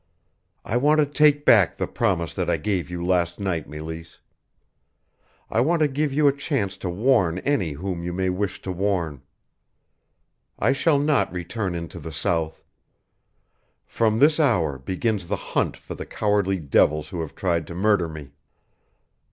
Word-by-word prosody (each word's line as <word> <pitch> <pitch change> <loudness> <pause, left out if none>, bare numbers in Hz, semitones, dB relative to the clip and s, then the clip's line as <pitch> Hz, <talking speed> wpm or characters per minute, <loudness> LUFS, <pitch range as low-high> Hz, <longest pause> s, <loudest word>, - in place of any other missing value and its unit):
"I 115 - 0
want 150 +4 +3
to 150 - +5
take 145 0 +3
back 100 -7 +5
the - - -1
promise 85 -5 -1
that - - -2
I - - +2
gave 95 -5 -2
you 90 -1 -4
last 90 -1 +1
night, 90 -6 -2
Meleese. 80 +2 -8 1.3
I 110 - 0
want 160 +5 +2
to 155 - +5
give 145 +1 -1
you 145 +2 +3
a 140 - +3
chance 135 - -2
to 90 - -4
warn 95 -3 +2
any 130 - +1
whom 90 +3 -4
you 90 - -3
may 95 +1 -1
wish 95 +1 -3
to 95 - -3
warn. 90 -7 -1 1.4
I 115 - +2
shall 145 +2 +2
not 145 - +1
return 90 +2 -3
into 85 -1 -6
the 80 - -7
South. 80 +2 -2 1.2
From 110 -1 +1
this 150 +5 +4
hour 85 - +2
begins 95 - -2
the - - -1
hunt - - -2
for - - -9
the - - -8
cowardly 100 -2 0
devils 75 -1 +2
who 85 - -4
have 80 - -7
tried 85 -4 -1
to 85 - -8
murder 100 -2 +2
me. 75 -3 -9
95 Hz, 165 wpm, -24 LUFS, 85-120 Hz, 1.4 s, to